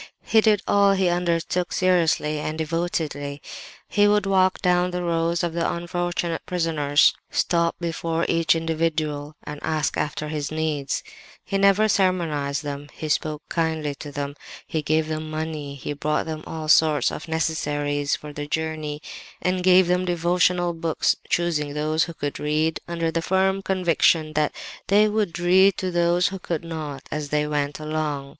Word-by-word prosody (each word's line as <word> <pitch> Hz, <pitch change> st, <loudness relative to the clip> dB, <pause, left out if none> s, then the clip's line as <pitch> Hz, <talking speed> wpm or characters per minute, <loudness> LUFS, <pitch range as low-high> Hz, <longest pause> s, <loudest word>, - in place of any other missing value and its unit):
He 220 Hz, -, +4 dB
did 210 Hz, -2 st, +3 dB
all 200 Hz, -1 st, +4 dB
he 190 Hz, -2 st, +2 dB
undertook 175 Hz, 0 st, 0 dB
seriously 165 Hz, -4 st, +2 dB
and 155 Hz, +1 st, -3 dB
devotedly. 155 Hz, -3 st, -2 dB, 0.5 s
He 205 Hz, 0 st, +3 dB
would 205 Hz, -1 st, +3 dB
walk 190 Hz, -1 st, +3 dB
down 180 Hz, 0 st, +3 dB
the 180 Hz, 0 st, -3 dB
rows 170 Hz, 0 st, 0 dB
of 170 Hz, -2 st, -1 dB
the 170 Hz, 0 st, 0 dB
unfortunate 175 Hz, -1 st, -2 dB
prisoners, 160 Hz, -5 st, +3 dB, 0.2 s
stop 170 Hz, -1 st, +1 dB
before 165 Hz, -1 st, -2 dB
each 165 Hz, -1 st, +3 dB
individual 155 Hz, -2 st, -1 dB
and 150 Hz, 0 st, -7 dB
ask 155 Hz, -1 st, -1 dB
after 150 Hz, 0 st, -2 dB
his 150 Hz, -1 st, -3 dB
needs—he 155 Hz, +4 st, -4 dB
never 200 Hz, +2 st, +4 dB
sermonized 165 Hz, -8 st, 0 dB
them; 145 Hz, 0 st, -5 dB
he 155 Hz, -, -6 dB
spoke 155 Hz, 0 st, -1 dB
kindly 160 Hz, -3 st, -1 dB
to 145 Hz, +1 st, -9 dB
them—he 145 Hz, +2 st, -5 dB
gave 155 Hz, +1 st, +1 dB
them 155 Hz, 0 st, -4 dB
money; 155 Hz, -2 st, -4 dB
he 140 Hz, +1 st, -5 dB
brought 150 Hz, +1 st, -1 dB
them 155 Hz, -1 st, -5 dB
all 160 Hz, -1 st, -5 dB
sorts 155 Hz, -1 st, +4 dB
of 155 Hz, -, -7 dB
necessaries 145 Hz, -3 st, -1 dB
for 150 Hz, -1 st, -9 dB
the 145 Hz, 0 st, -5 dB
journey, 155 Hz, -1 st, -3 dB, 0.4 s
and 185 Hz, 0 st, 0 dB
gave 185 Hz, 0 st, +6 dB
them 180 Hz, +1 st, +1 dB
devotional 175 Hz, 0 st, +1 dB
books, 165 Hz, -1 st, 0 dB
choosing 150 Hz, -4 st, 0 dB
those 155 Hz, +2 st, +1 dB
who 170 Hz, -, -9 dB
could 145 Hz, -2 st, -4 dB
read, 155 Hz, +2 st, 0 dB
under 165 Hz, -1 st, -1 dB
the 165 Hz, -, -1 dB
firm 190 Hz, +2 st, +1 dB
conviction 170 Hz, -4 st, +2 dB
that 150 Hz, -1 st, +1 dB, 0.4 s
they 210 Hz, +2 st, +5 dB
would 210 Hz, -4 st, -1 dB
read 185 Hz, +2 st, +4 dB
to 185 Hz, -1 st, -2 dB
those 175 Hz, +1 st, +2 dB
who 195 Hz, -1 st, -6 dB
could 170 Hz, -3 st, -3 dB
not, 155 Hz, -5 st, -6 dB
as 150 Hz, -1 st, -3 dB
they 150 Hz, 0 st, +1 dB
went 145 Hz, -1 st, -2 dB
along. 155 Hz, -2 st, -3 dB
160 Hz, 160 wpm, -24 LUFS, 150-175 Hz, 0.5 s, gave